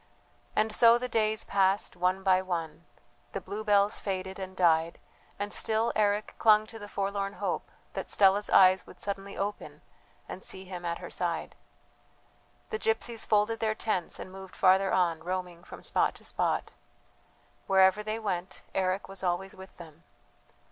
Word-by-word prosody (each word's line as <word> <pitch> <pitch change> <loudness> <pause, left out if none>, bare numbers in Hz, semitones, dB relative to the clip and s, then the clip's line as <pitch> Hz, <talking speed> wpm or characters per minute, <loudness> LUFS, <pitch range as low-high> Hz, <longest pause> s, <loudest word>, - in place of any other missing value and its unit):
And 215 0 +1
so 230 +1 +6
the 250 +1 -3
days 220 -2 +1
passed 195 0 +1
one 185 +2 0
by 185 -1 +4
one; 170 -4 -4 0.5
the - - -2
bluebells 205 -1 +1
faded 190 -1 -4
and 190 0 -7
died, 165 -2 +3 0.4
and 205 0 -3
still 225 +1 +1
Eric 210 0 +1
clung 215 -1 +5
to 225 +1 -11
the 205 - -8
forlorn 200 0 -2
hope - - -3 0.2
that - - -5
Stella's 200 +1 +3
eyes 185 -1 +5
would - - -14
suddenly 200 0 -4
open 205 +1 -5 0.4
and 185 - -7
see 190 0 -8
him 180 -1 -7
at 170 0 -2
her - - -9
side. - - -3 1.2
The 440 - -2
gypsies 225 - -1
folded 210 +2 +2
their 215 -1 0
tents 190 -7 -2
and 185 - -8
moved 190 0 -11
farther 190 +1 +4
on, 170 -3 +1
roaming 180 -1 -4
from - - -11
spot - - +1
to - - -16
spot. - - -1 1.0
Wherever 190 +1 +5
they 215 +1 -3
went 185 -5 -4
Eric 190 +1 0
was 195 -1 -8
always 185 +1 -1
with 190 0 -13
them. 165 -1 -13
195 Hz, 160 wpm, -29 LUFS, 185-210 Hz, 1.2 s, so